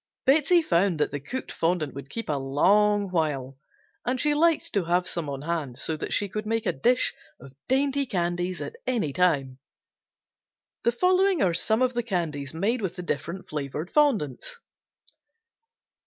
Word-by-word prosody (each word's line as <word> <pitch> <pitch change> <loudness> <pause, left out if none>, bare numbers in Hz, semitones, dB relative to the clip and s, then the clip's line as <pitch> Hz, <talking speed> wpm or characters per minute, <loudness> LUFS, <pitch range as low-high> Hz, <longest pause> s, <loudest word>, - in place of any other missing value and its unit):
Betsey 315 +5 +4
found 175 - +2
that 150 - +1
the 145 - -3
cooked 250 - -5
fondant 165 -3 0
would 140 0 -9
keep 230 - -5
a 150 - 0
long 195 +9 +2
while 140 -6 -1 0.4
and 250 +1 -1
she 295 +2 +2
liked 325 +1 +2
to 200 -4 +1
have 175 +2 +1
some 165 -4 -3
on 140 0 -5
hand 150 -6 -3
so 160 - -2
that - - -5
she 205 - +1
could 215 +2 -5
make 225 0 -1
a - - +1
dish 250 +1 +2 0.3
of 130 +1 -13
dainty 275 +1 +1
candies 175 -2 -2
at 470 - -6
any 215 - 0
time. 135 -7 +1 1.3
The 235 - +5
following 365 - +3
are 180 -3 +2
some 220 +7 +2
of 255 0 +1
the 240 - 0
candies 165 - -3
made 210 +9 0
with 190 -4 -3
the 180 - -6
different 170 +3 -4
flavored 150 +3 -4
fondants. 285 - +1
180 Hz, 170 wpm, -26 LUFS, 150-245 Hz, 1.3 s, The